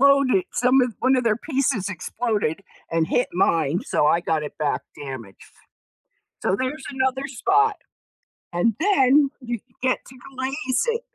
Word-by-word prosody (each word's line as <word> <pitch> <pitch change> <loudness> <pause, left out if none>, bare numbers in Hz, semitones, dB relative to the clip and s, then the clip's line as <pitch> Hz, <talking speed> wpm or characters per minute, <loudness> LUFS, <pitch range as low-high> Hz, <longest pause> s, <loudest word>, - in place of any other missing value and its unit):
Exploded 275 +5 +4
some 250 +2 +4
of 245 -3 0
1 260 +1 +3
of 250 - +1
their 215 -2 +3
pieces 260 - -1
exploded 205 -1 -2 0.3
and 165 -1 +1
hit 245 - +1
mine 165 -2 +2
so 150 - +1
I 170 - +4
got 160 -3 0
it 150 - -7
back 150 -2 0
damaged. 130 -8 -9 0.9
So, - - +1
there's 260 +4 -3
another 265 0 -1
spot 410 - +2 0.8
and 185 +6 +2
then 290 -6 +4
you 240 -2 -4 0.2
get 255 0 +1
to 260 - -14 0.2
glaze 260 - -1
it. 465 0 0
250 Hz, 150 wpm, -23 LUFS, 175-270 Hz, 0.9 s, Exploded